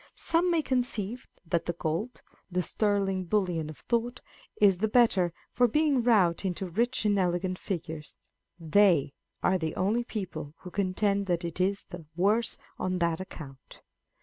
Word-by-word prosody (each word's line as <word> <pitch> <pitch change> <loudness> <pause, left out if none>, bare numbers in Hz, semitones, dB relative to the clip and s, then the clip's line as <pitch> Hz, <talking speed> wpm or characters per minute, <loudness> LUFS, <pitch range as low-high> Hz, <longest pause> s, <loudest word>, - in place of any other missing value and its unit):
Some 335 +2 +1
may 335 -3 +2
conceive 245 -3 -2 0.2
that 170 0 -1
the 175 - 0
gold, 170 +9 -3 0.3
the 180 0 0
sterling 195 -3 0
bullion 175 -5 0
of 155 - -9
thought, 240 +1 -1 0.4
is 195 -4 +5
the 220 - +2
better 210 -6 +3 0.2
for 245 0 +4
being 295 +1 +2
wrought 205 -9 +3
into 190 0 -2
rich 230 +7 0
and 205 -1 +3
elegant 180 0 0
figures; 160 -4 -5 0.4
they 165 -4 +3 0.3
are 185 0 +3
the 160 -2 -3
only 215 +6 +1
people 160 -10 -6
who 180 - -9
contend 200 +1 0
that 175 -1 0
it 170 +2 -3
is 195 +2 +1
the 175 -3 -10
worse 210 +6 +2 0.2
on 185 0 -1
that 170 -1 0
account. 135 -8 -11
190 Hz, 155 wpm, -29 LUFS, 170-220 Hz, 0.4 s, is